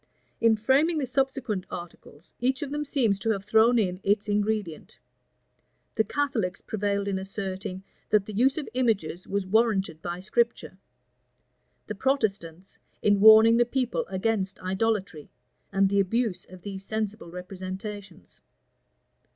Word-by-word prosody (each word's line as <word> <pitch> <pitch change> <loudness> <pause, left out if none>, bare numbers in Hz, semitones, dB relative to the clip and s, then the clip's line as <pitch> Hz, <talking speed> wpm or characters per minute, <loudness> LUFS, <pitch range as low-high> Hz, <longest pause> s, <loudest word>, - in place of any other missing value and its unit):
In 230 -1 +4
framing 275 +9 +2
the 290 - 0
subsequent 255 -6 -1
articles, 175 -2 -10
each 260 +3 0
of 280 - -6
them 295 0 -2
seems 240 -9 +1
to 225 - -2
have 200 -3 -1
thrown 225 +3 +4
in 185 -4 0
its 205 +2 +1
ingredient. 205 -5 -2 1.0
The 220 - +2
Catholics 230 -10 -1
prevailed 200 -1 -2
in 195 -1 -1
asserting, 190 -1 -5 0.3
that 210 -2 +3
the 215 - -8
use 260 +7 +2
of 305 - -3
images 205 -9 -1
was 200 -1 -1
warranted 195 -6 +1
by 175 0 -4
Scripture; 230 -1 -1 1.1
the - - -5
Protestants, 195 - -2 0.2
in 205 -1 +4
warning 220 +2 +8
the 240 - +5
people 245 0 -2
against 195 0 -1
idolatry, 190 -4 -1 0.4
and 195 0 +3
the 200 +1 +1
abuse 215 +1 0
of 185 -1 -13
these 195 -1 -6
sensible 215 -3 -4
representations. 190 +1 -8
205 Hz, 135 wpm, -26 LUFS, 190-230 Hz, 1.1 s, warning